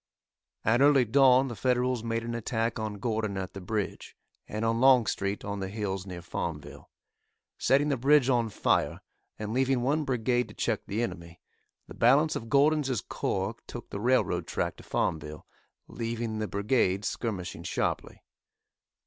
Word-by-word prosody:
At 120 Hz, +4 st, +3 dB
early 140 Hz, -3 st, +6 dB
dawn 130 Hz, +2 st, +5 dB
the 120 Hz, -, -5 dB
Federals 125 Hz, -1 st, 0 dB
made 115 Hz, 0 st, -2 dB
an 115 Hz, 0 st, -4 dB
attack 115 Hz, 0 st, -2 dB
on 110 Hz, -1 st, -3 dB
Gordon 110 Hz, -2 st, -2 dB
at 95 Hz, -1 st, -4 dB
the 100 Hz, -, -7 dB
bridge, 105 Hz, +2 st, -4 dB, 0.3 s
and 110 Hz, +2 st, -3 dB
on 115 Hz, +1 st, +1 dB
Longstreet 115 Hz, -6 st, +3 dB
on 100 Hz, 0 st, -3 dB
the 95 Hz, -, -3 dB
hills 100 Hz, -2 st, -4 dB
near 90 Hz, -2 st, -7 dB
Farmville. 80 Hz, -4 st, -6 dB, 0.7 s
Setting 145 Hz, +2 st, +3 dB
the 140 Hz, -, +1 dB
bridge 140 Hz, +1 st, +4 dB
on 120 Hz, -4 st, +2 dB
fire, -, -, 0 dB, 0.4 s
and 105 Hz, 0 st, -4 dB
leaving 130 Hz, 0 st, +2 dB
one 150 Hz, +4 st, +1 dB
brigade 125 Hz, -2 st, 0 dB
to -, -, -13 dB
check -, -, -1 dB
the 110 Hz, +4 st, -1 dB
enemy, 85 Hz, -6 st, -6 dB, 0.5 s
the -, -, -10 dB
balance 140 Hz, +6 st, +4 dB
of 115 Hz, -, -5 dB
Gordon's 145 Hz, +1 st, +3 dB, 0.2 s
corps -, -, -2 dB
took -, -, -9 dB
the 100 Hz, -, -4 dB
railroad 125 Hz, +4 st, +1 dB
track -, -, -2 dB
to -, -, -13 dB
Farmville, 75 Hz, -1 st, -2 dB, 0.4 s
leaving 115 Hz, -1 st, -3 dB
the 105 Hz, -, -2 dB
brigade 100 Hz, 0 st, +1 dB
skirmishing 100 Hz, -7 st, -3 dB
sharply. -, -, -3 dB
115 Hz, 155 wpm, -28 LUFS, 100-130 Hz, 0.7 s, early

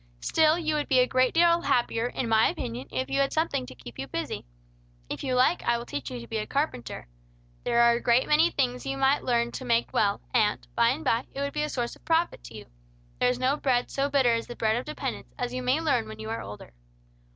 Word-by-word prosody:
Still 315 Hz, 0 st, +3 dB
you 315 Hz, -3 st, -1 dB
would 300 Hz, -1 st, -1 dB
be 265 Hz, -, +3 dB
a 250 Hz, -, +5 dB
great 255 Hz, 0 st, +2 dB
deal 340 Hz, 0 st, +4 dB
happier, 240 Hz, -5 st, +1 dB
in 245 Hz, -, -3 dB
my 225 Hz, 0 st, +4 dB
opinion, 120 Hz, +3 st, -5 dB
if 130 Hz, 0 st, -2 dB
you 275 Hz, -, -1 dB
had 275 Hz, 0 st, +2 dB
something 315 Hz, -, -1 dB
to 130 Hz, -, -11 dB
keep 120 Hz, 0 st, -12 dB
you 135 Hz, -, -4 dB
busy. 125 Hz, -, -4 dB, 0.6 s
If -, -, -5 dB
you 255 Hz, -2 st, 0 dB
like, 255 Hz, +7 st, +3 dB
I 235 Hz, -, +1 dB
will 235 Hz, -, -6 dB
teach 145 Hz, -, -5 dB
you 125 Hz, -, -6 dB
to 115 Hz, -, -9 dB
be 220 Hz, -, -2 dB
a 215 Hz, -, -4 dB
carpenter. 275 Hz, -, -3 dB, 0.6 s
There 235 Hz, 0 st, +3 dB
are 235 Hz, -, +6 dB
a 235 Hz, -, -1 dB
great 240 Hz, +1 st, +3 dB
many 310 Hz, +3 st, +4 dB
things 250 Hz, -5 st, -1 dB
you 275 Hz, 0 st, -3 dB
might 270 Hz, +1 st, +2 dB
learn 235 Hz, -1 st, +1 dB
to 260 Hz, -, -6 dB
make 235 Hz, -2 st, +1 dB
well, 200 Hz, -1 st, +2 dB
and, 215 Hz, -4 st, +1 dB
by 235 Hz, -, +3 dB
and 285 Hz, +6 st, -2 dB
by, 235 Hz, 0 st, +1 dB
it -, -, -6 dB
would 280 Hz, 0 st, -2 dB
be 300 Hz, -, -1 dB
a 300 Hz, -, -1 dB
source 240 Hz, -4 st, -3 dB
of -, -, -23 dB
profit 330 Hz, -, 0 dB
to 115 Hz, -2 st, -9 dB
you. 105 Hz, -, -10 dB, 0.5 s
There 250 Hz, -, +3 dB
is 250 Hz, -, 0 dB
no 260 Hz, +3 st, +1 dB
bread 250 Hz, -4 st, 0 dB
so 275 Hz, +1 st, 0 dB
bitter 265 Hz, -4 st, +3 dB
as 230 Hz, 0 st, -2 dB
the 240 Hz, -, -7 dB
bread 220 Hz, -1 st, +1 dB
of 245 Hz, -, -3 dB
dependence, 305 Hz, -, -5 dB
as 245 Hz, 0 st, -3 dB
you 255 Hz, -, -3 dB
may 255 Hz, +4 st, +1 dB
learn 300 Hz, -, +1 dB
when 110 Hz, 0 st, -8 dB
you 110 Hz, 0 st, -6 dB
are 115 Hz, -, -3 dB
older." 100 Hz, -9 st, -10 dB
245 Hz, 255 wpm, -27 LUFS, 220-280 Hz, 0.6 s, are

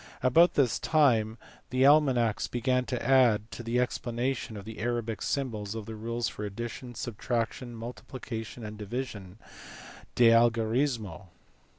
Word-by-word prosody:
About 165 Hz, +8 st, +5 dB
this 125 Hz, -8 st, +2 dB
time 115 Hz, -8 st, +2 dB, 0.3 s
the 130 Hz, +2 st, +2 dB
almanacks 135 Hz, -7 st, +4 dB
began 125 Hz, +1 st, 0 dB
to 125 Hz, -3 st, -3 dB
add 120 Hz, -5 st, +4 dB
to 95 Hz, -, -7 dB
the 120 Hz, +1 st, -1 dB
explanation 120 Hz, -1 st, -2 dB
of 100 Hz, -, -9 dB
the 110 Hz, 0 st, -8 dB
Arabic 115 Hz, -2 st, -2 dB
symbols 110 Hz, -7 st, -2 dB
the 110 Hz, 0 st, -6 dB
rules 115 Hz, +2 st, -3 dB
of -, -, -16 dB
addition, 115 Hz, +4 st, -6 dB
subtraction, 120 Hz, +1 st, -3 dB
multiplication, 115 Hz, -1 st, -7 dB
and 105 Hz, 0 st, -8 dB
division, 105 Hz, -3 st, -6 dB
u -, -, -24 dB, 0.7 s
de 120 Hz, -2 st, +6 dB
al 115 Hz, +1 st, +6 dB
gorismo." 110 Hz, -, -2 dB
120 Hz, 135 wpm, -29 LUFS, 110-125 Hz, 0.7 s, de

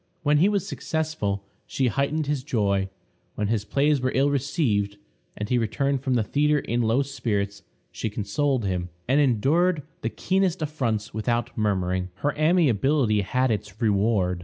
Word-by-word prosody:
When 145 Hz, 0 st, +3 dB
he 185 Hz, +6 st, +5 dB
was 200 Hz, -2 st, 0 dB
successful, 155 Hz, -, -2 dB, 0.2 s
she 135 Hz, -, 0 dB
heightened 140 Hz, +5 st, 0 dB
his 145 Hz, -2 st, -1 dB
joy; 100 Hz, -7 st, 0 dB, 0.5 s
when 105 Hz, -1 st, -1 dB
his 110 Hz, -3 st, 0 dB
plays 140 Hz, +6 st, +2 dB
were 130 Hz, 0 st, 0 dB
ill 140 Hz, +2 st, +3 dB
received, 125 Hz, -8 st, 0 dB, 0.4 s
and 105 Hz, -, -3 dB
he 125 Hz, +2 st, +2 dB
returned 135 Hz, +4 st, 0 dB
from 130 Hz, -2 st, 0 dB
the 115 Hz, -, +2 dB
theatre 150 Hz, +7 st, +2 dB
in 120 Hz, -3 st, -1 dB
low 115 Hz, +4 st, +2 dB
spirits, 105 Hz, -7 st, -2 dB, 0.3 s
she 110 Hz, -, -3 dB
consoled 115 Hz, +5 st, -1 dB
him, 90 Hz, -2 st, -2 dB, 0.2 s
and 135 Hz, +4 st, +4 dB
endured 145 Hz, -, +2 dB, 0.2 s
the 115 Hz, -, -1 dB
keenest 185 Hz, +2 st, 0 dB
affronts 115 Hz, -8 st, -2 dB
without 120 Hz, +1 st, -1 dB
murmuring. 95 Hz, -3 st, 0 dB
Her 145 Hz, 0 st, -1 dB
amiability 145 Hz, -, +3 dB
had 130 Hz, +5 st, +1 dB
its 105 Hz, -1 st, -4 dB
reward. 100 Hz, -4 st, +1 dB
125 Hz, 160 wpm, -25 LUFS, 105-145 Hz, 0.5 s, he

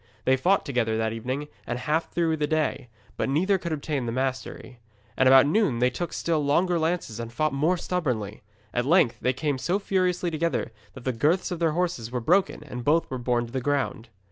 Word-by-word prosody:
They 130 Hz, -, +4 dB
fought 180 Hz, +9 st, +2 dB
together 115 Hz, -5 st, 0 dB
that 110 Hz, 0 st, 0 dB
evening 130 Hz, +6 st, -4 dB, 0.2 s
and 120 Hz, -, -2 dB
half 155 Hz, +5 st, -1 dB
through 165 Hz, -2 st, +1 dB
the 150 Hz, -1 st, 0 dB
next -, -, -13 dB
day, 155 Hz, -5 st, 0 dB, 0.3 s
but -, -, -1 dB
neither 185 Hz, +8 st, +2 dB
could 170 Hz, -2 st, -4 dB
obtain 145 Hz, -4 st, -2 dB
the -, -, -1 dB
mastery. 130 Hz, 0 st, -4 dB, 0.4 s
And 130 Hz, -, +3 dB
about 135 Hz, +1 st, +8 dB
noon 155 Hz, -, +2 dB
they 125 Hz, +1 st, +2 dB
took 175 Hz, +5 st, -4 dB
still 160 Hz, -3 st, 0 dB
stronger 170 Hz, +5 st, +2 dB
lances 160 Hz, -9 st, -2 dB
and 115 Hz, 0 st, -5 dB
fought 155 Hz, +4 st, 0 dB
most 160 Hz, +6 st, +1 dB
stubbornly. 125 Hz, -, -2 dB, 0.3 s
At 120 Hz, +1 st, 0 dB
length 165 Hz, -7 st, +4 dB
they 125 Hz, -, +1 dB
came 140 Hz, 0 st, -2 dB
so 175 Hz, +8 st, 0 dB
furiously 185 Hz, -3 st, 0 dB
together 160 Hz, -6 st, -1 dB, 0.2 s
that 130 Hz, -, -10 dB
the 130 Hz, -, -1 dB
girths 160 Hz, -, +1 dB
of 175 Hz, -, -3 dB
their 165 Hz, -2 st, +2 dB
horses 170 Hz, -10 st, -1 dB
were 125 Hz, 0 st, -2 dB
broken 175 Hz, +5 st, +1 dB
and 125 Hz, -4 st, -7 dB
both 155 Hz, +4 st, +2 dB
were 130 Hz, -, -3 dB
borne 120 Hz, -1 st, 0 dB
to 115 Hz, -, -12 dB
the 130 Hz, -, -1 dB
ground. 135 Hz, -4 st, -1 dB
145 Hz, 215 wpm, -26 LUFS, 125-170 Hz, 0.4 s, about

